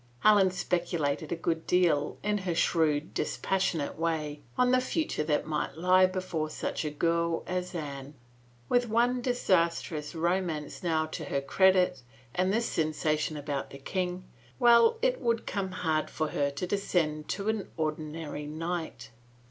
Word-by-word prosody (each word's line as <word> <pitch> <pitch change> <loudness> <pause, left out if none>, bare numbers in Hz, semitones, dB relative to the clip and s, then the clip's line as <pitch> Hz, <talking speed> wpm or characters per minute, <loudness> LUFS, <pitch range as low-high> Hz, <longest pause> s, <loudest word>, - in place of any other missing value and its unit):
Helen 205 -3 +6
speculated 170 -5 -1
a - - +1
good 165 -1 -2
deal, 165 -5 +2
in 210 0 +1
her 180 -3 -2
shrewd, 155 -3 +1
dispas 195 - -1
sionate 160 -6 -1
way, 155 -3 -2 0.2
on 250 0 +4
the 255 0 +4
future 300 - -1
that 150 -1 +1
might 150 -1 -2
lie 185 +2 +5
before 185 -4 -3
such 155 - -3
a 155 - -1
girl 170 +2 0
as 180 0 -3
Anne. 140 -2 -6 0.5
With 245 -1 +2
one 240 +3 +2
disastrous 170 - 0
romance 170 -2 -1
now 160 -3 +1
to 155 0 -6
her 140 - -1
credit 180 0 +3 0.3
and 185 +1 +1
this 230 +3 +1
sensation 155 -1 0
about 145 -1 -3
the 140 - -9
king 180 +5 -3 0.2
— - - -27
well, 240 - +6
it - - +2
would 230 -1 0
come 195 -2 -2
hard 160 -4 -1
for 155 -1 -2
her 140 -1 0
to 140 +5 -4
descend 170 -6 0
to 200 +1 -3
an 220 -2 -2
ordinary 155 -1 -3
knight. 160 -6 -4
170 Hz, 155 wpm, -29 LUFS, 155-190 Hz, 0.5 s, Helen